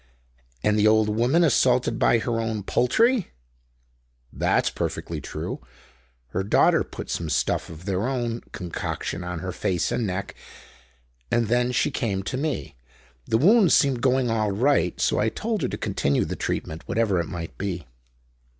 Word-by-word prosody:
"And 105 0 +2
the 105 - +5
old 110 0 +4
woman 120 +10 +2
assaulted 125 -6 +2
by - - +4
her 115 0 -1
own 110 -2 -3
poultry?" 220 - +2 1.0
"That's - - +1
perfectly - - -4
true. - - -5 0.7
Her 95 - -2
daughter 100 - +4
put - - -8
some 85 -2 -2
stuff 70 - 0
of 80 +1 -11
their 100 +3 -1
own 120 -3 -2
concoction 90 0 -4
on 90 -2 -5
her 90 - -4
face 90 -1 -1
and 115 - 0
neck, 95 +1 -4 1.0
and 115 -2 +1
then 120 +1 +2
she 125 - +1
came 100 -5 -2
to 115 - -4
me. 135 - -3 0.5
The 110 - +2
wounds 195 - +5
seemed 135 -4 +2
going 130 -2 +2
all 110 -2 +1
right, 115 - +1
so - - +2
I 110 - +2
told 215 - -3
her 130 - +1
to - - -4
continue 70 0 0
the - - -4
treatment, 80 +1 -3
whatever 110 -5 +1
it 85 - -2
might 85 -2 -6
be." 90 -5 -3
115 Hz, 160 wpm, -24 LUFS, 95-125 Hz, 1.0 s, the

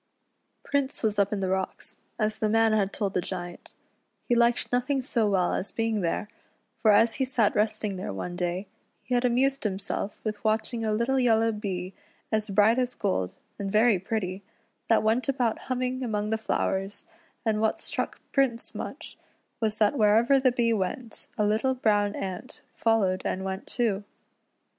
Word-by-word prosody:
Prince 280 -2 -1
was 210 -2 +1
up 200 0 +3
in 205 -2 -1
the 190 - 0
rocks, 190 0 -3 0.2
as 215 0 -1
the 215 - +1
man 225 0 +4
had 200 -2 +2
told 200 -1 -2
the 180 - +1
Giant. 175 -1 -7 0.5
He - - +2
liked 235 0 +3
nothing 250 +3 +1
so 240 -5 +1
well 185 -3 +2
as 190 - -2
being 225 -2 0
there, 170 +4 -1 0.5
for 220 - +4
as 225 +2 +5
he - - +5
sat 245 -5 +2
resting 210 -2 0
there 185 - -4
one 135 - -5
day, 180 +2 -2 0.4
he 250 - -4
had 245 0 +3
amused 265 +3 +2
himself 200 0 -3
with 215 -1 -4
watching 220 +2 0
a 215 - 0
little 235 +5 +1
yellow 225 -2 +3
Bee, 195 -4 -4 0.4
as 215 -1 0
bright 210 +5 +4
as 250 -1 -1
gold, 95 - -1 0.2
and 195 -1 -3
very 215 -1 +4
pretty, 190 -1 -3 0.5
that 225 - +4
went 230 +5 +1
about 245 -4 +1
humming 255 0 -1
among 215 -3 -1
the 220 - +2
flowers, 195 -2 -1 0.4
and 215 -1 +1
what 220 - +1
struck - - -3
Prince 260 -4 +1
much, - - -7 0.4
was 220 -1 0
that 220 +5 +2
wherever 225 +6 +5
the 260 -1 +4
Bee 235 -1 +2
went 220 +3 -3
a 210 - +2
little 220 +5 +1
brown 205 -4 +2
ant 190 +6 -6
followed 205 -5 +2
and 190 +1 -2
went 190 +1 -4
too. 215 -5 0
215 Hz, 175 wpm, -27 LUFS, 200-235 Hz, 0.5 s, as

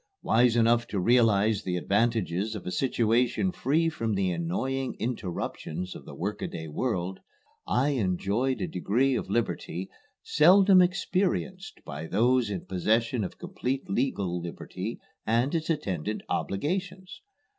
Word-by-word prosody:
Wise 120 +1 +4
enough 120 0 +3
to 105 - -2
realize 110 -1 +3
the 90 -1 -2
advantages 110 0 0
of 105 - -7
a 90 - -3
situation 125 - +1
free 160 +1 +1
from 115 -9 -1
the 95 -2 +1
annoying 130 +11 -2
interruptions 90 -5 -4
of - - -10
the - - -10
workaday 80 - -4
world, 95 +1 -2 0.5
I 135 +4 +2
enjoyed 110 +1 0
a 90 - -1
degree 120 +9 +1
of - - -2
liberty 95 -5 -2 0.3
seldom 185 +4 +6
experienced 185 +1 -1
by 75 +2 -6
those 120 +4 +2
in 95 -4 -4
possession 110 +5 +1
of 95 - -6
complete 140 -8 -3
legal 100 -7 -1
liberty 90 +5 -6 0.3
and 120 +5 +2
its 160 -1 -1
attendant 105 - -2
obligations. 185 - -3
115 Hz, 130 wpm, -28 LUFS, 95-135 Hz, 0.5 s, seldom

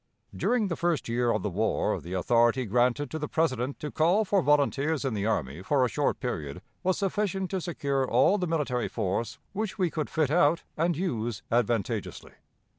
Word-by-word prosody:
During 240 -4 +1
the 170 - -2
first 170 -3 0
year 120 +1 +1
of 105 -4 0
the 105 - -1
war 110 +5 0
the 85 - -7
authority 120 +6 +2
granted 125 +6 +1
to 160 - -3
the 150 - -3
President 135 -5 -1
to 150 - -4
call 180 +7 +3
for 195 -1 +2
volunteers 150 0 +2
in 130 - 0
the 105 0 -1
army 80 -7 -1
for 130 +6 +2
a - - -1
short 145 +6 0
period 80 - -4 0.2
was 185 0 +1
sufficient 195 -1 -1
to 190 -2 -1
secure 140 -6 -1
all 205 +2 +4
the 180 - -1
military 145 -7 -1
force 110 +6 -2 0.2
which 210 0 -3
we 180 -4 +1
could 155 -2 -3
fit 155 -3 0
out 165 0 +3
and 165 0 +1
use 120 - -2
advantageously. 115 -3 -1
140 Hz, 190 wpm, -28 LUFS, 115-170 Hz, 0.2 s, all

